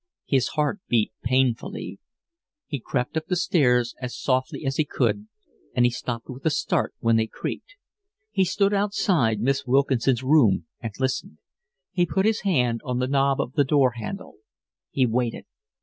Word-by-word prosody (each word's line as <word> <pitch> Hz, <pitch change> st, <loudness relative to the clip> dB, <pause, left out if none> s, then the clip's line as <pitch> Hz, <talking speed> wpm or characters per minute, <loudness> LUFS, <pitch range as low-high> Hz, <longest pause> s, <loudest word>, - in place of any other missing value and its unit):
His 130 Hz, -3 st, +2 dB
heart 150 Hz, +7 st, +1 dB
beat 115 Hz, -3 st, +2 dB
painfully. 125 Hz, -1 st, -1 dB, 0.7 s
He 145 Hz, -, -4 dB
crept 125 Hz, +4 st, -2 dB
up 160 Hz, 0 st, -2 dB
the 180 Hz, -, 0 dB
stairs 125 Hz, -9 st, +2 dB
as 125 Hz, -1 st, -5 dB
softly 130 Hz, +2 st, -1 dB
as 135 Hz, 0 st, -1 dB
he 155 Hz, -, +3 dB
could, 110 Hz, -7 st, -1 dB, 0.5 s
and 120 Hz, -, +4 dB
he 120 Hz, -, +3 dB
stopped 120 Hz, -1 st, -5 dB
with 130 Hz, +1 st, -9 dB
a 160 Hz, -, +3 dB
start 175 Hz, 0 st, 0 dB
when 115 Hz, -1 st, +3 dB
they 110 Hz, 0 st, +1 dB
creaked. -, -, -6 dB, 0.6 s
He 190 Hz, -, +2 dB
stood 195 Hz, +2 st, +1 dB
outside 185 Hz, -, +1 dB
Miss 135 Hz, +2 st, 0 dB
Wilkinson's 130 Hz, -1 st, +2 dB
room 130 Hz, -, +4 dB
and 115 Hz, -, -5 dB
listened; 130 Hz, -11 st, -2 dB, 0.5 s
he 175 Hz, -1 st, +1 dB
put 190 Hz, +3 st, +1 dB
his 220 Hz, 0 st, +2 dB
hand 125 Hz, -, +1 dB
on 125 Hz, -3 st, -2 dB
the 125 Hz, -, +1 dB
knob 135 Hz, 0 st, +2 dB
of 125 Hz, -, -2 dB
the 145 Hz, -, +3 dB
door 135 Hz, -2 st, +3 dB
handle. 195 Hz, -, -7 dB, 0.5 s
He 130 Hz, -, +2 dB
waited. 120 Hz, 0 st, -1 dB
130 Hz, 165 wpm, -25 LUFS, 120-155 Hz, 0.7 s, and